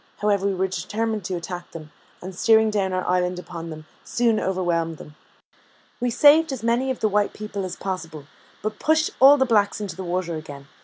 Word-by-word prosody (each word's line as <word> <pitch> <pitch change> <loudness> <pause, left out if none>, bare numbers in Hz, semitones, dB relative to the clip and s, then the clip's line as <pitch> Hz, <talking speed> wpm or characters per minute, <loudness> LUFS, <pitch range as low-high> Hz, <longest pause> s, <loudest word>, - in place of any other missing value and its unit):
However, 200 -1 +1
we 195 - 0
were 190 +1 0
determined 215 +3 -3
to 185 - -2
attack 175 +1 -6
them, 155 -2 -9 0.3
and 185 +1 -7
steering 220 +3 +4
down 195 -3 0
our 185 0 -2
island 180 0 +1
upon 170 -2 -7
them, 155 -1 -9 0.2
soon 235 -2 +1
overwhelmed 170 -3 -1
them: 150 - -12 0.9
we 245 0 0
saved 295 +5 +5
as 255 -4 -5
many 240 +3 +1
of 260 - -3
the 220 - +3
white 205 0 +1
people 210 -2 -5
as 185 - -5
possible, 165 -6 -6 0.4
but 215 0 -4
pushed 315 0 +2
all 275 +2 +8
the 265 - +3
blacks 210 -5 +2
into 200 -5 -5
the 190 - -6
water 175 -2 -2
again. 140 -3 -10
195 Hz, 200 wpm, -23 LUFS, 175-225 Hz, 0.9 s, all